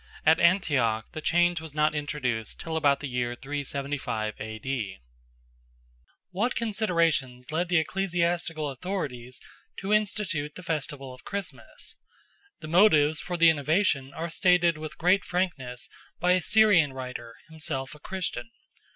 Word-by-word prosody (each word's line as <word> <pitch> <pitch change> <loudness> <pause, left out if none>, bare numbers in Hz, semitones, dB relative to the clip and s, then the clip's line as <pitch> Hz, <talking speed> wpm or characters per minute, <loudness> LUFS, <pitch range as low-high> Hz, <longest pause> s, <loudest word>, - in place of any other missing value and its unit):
At 160 +1 +6
Antioch 145 - +2
the 155 - -6
change 175 +1 +2
was 160 -2 -9
not 150 0 +3
introduced 130 -7 -3
till 165 -1 -4
about 145 -3 +3
the 145 - -3
year 120 -1 -2
375 140 -5 -3
A.D. 110 -1 -4 1.3
What 215 +7 0
considerations 170 - 0
led 170 +3 0
the 180 - +4
ecclesiastical 170 -3 0
authorities 130 -6 -4 0.4
to 200 +2 -1
institute 190 -8 0
the 180 - -9
festival 145 -5 -3
of 125 - -14
Christmas? 200 -2 -5 0.6
The 155 - -7
motives 155 -4 +5
for 175 -1 -3
the 165 0 +7
innovation 145 -2 +1
are 165 +1 -3
stated 175 -1 +4
with 155 0 -7
great 180 +3 +3
frankness 150 -9 -2 0.3
by 180 +1 +3
a 180 0 +4
Syrian 195 -9 +5
writer, 125 -3 -7
himself 155 -4 -4
a 150 - -13
Christian. 190 +6 -4
155 Hz, 135 wpm, -27 LUFS, 135-180 Hz, 1.3 s, the